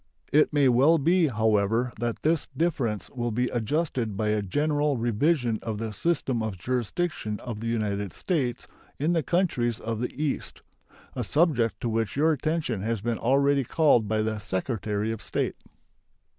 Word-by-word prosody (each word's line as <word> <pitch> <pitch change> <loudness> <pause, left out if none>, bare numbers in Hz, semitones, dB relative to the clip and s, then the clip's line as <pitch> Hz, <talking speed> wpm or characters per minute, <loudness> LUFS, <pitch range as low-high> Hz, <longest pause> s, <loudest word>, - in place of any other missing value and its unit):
It 150 +1 +5
may 145 -2 +4
well 135 +7 +5
be, 165 +3 +3
however, 110 0 +1
that 120 -1 -3
this 160 -1 +1
difference 125 - -1
will 120 -2 -2
be 125 +2 0
adjusted 120 - -1
by 105 0 0
a 105 0 +1
general 145 +6 0
revision 120 +1 +1
of 110 -2 -4
the 110 0 -4
system 135 -4 0
of 110 -3 -3
jurisdiction 120 - -2
of 115 -4 -6
the 115 - -4
United 105 -4 -1
States 130 -9 -2 0.3
in 155 +5 +1
the 165 - +2
countries 130 - 0
of 115 0 -3
the 125 - -1
East, 150 -2 -3 0.5
a - - -2
subject 145 -8 +2
to - - -1
which 110 -2 -1
your 155 +3 +3
attention 155 - -1
has 115 0 -2
been 115 +1 -2
already 140 +2 +3
called 125 -5 +3
by 110 +1 +1
the 110 0 -2
Secretary 105 +1 -2
of 115 - -5
State. - - -2
120 Hz, 165 wpm, -26 LUFS, 110-150 Hz, 0.5 s, It